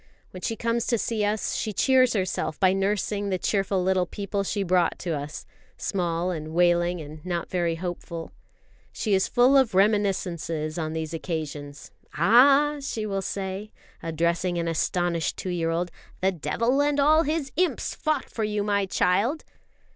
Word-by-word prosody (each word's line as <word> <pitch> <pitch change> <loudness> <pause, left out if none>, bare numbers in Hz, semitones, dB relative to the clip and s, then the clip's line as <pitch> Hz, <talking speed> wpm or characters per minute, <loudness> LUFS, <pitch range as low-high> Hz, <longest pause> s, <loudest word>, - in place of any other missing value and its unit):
When 185 - -9
she 225 - -2
comes 230 +1 -1
to 235 - +2
see 220 0 -1
us, 210 +1 0
she 215 - -2
cheers 255 +2 +4
herself 185 -6 -2
by 185 -1 +4
nursing 200 +1 -1
the 185 - 0
cheerful 195 0 0
little 185 -1 +2
people 200 +1 -3
she 200 +1 -1
brought 180 -1 +2
to 175 - -4
us, 145 -1 -5 0.3
small 175 -2 -1
and 160 -1 -5
wailing 175 0 +3
and 155 0 -9
not 175 -2 -3
very 175 -2 0
hopeful. 170 -1 -6 0.6
She 215 - -1
is 190 0 +3
full 250 +3 +4
of 260 -8 +4
reminiscences 180 -6 +1
on 155 -1 -3
these 160 0 -4
occasions. 150 -4 -5 0.2
"Ah," 275 - +5
she 225 -5 -3
will 195 -2 -2
say, 195 +2 -4 0.3
addressing 170 +2 0
an 170 0 -1
astonished 170 0 0
two 185 - -4
year 165 -2 -1
old, 170 +1 -1 0.3
"the 190 +1 +2
devil 230 - 0
and 290 0 +1
all 305 +3 +5
his 305 -3 -2
imps 360 +3 0
fought 310 -1 -1
for 225 - -4
you, 210 -1 -1
my 200 -1 +1
child!" 200 - +1
190 Hz, 165 wpm, -26 LUFS, 170-215 Hz, 0.6 s, Ah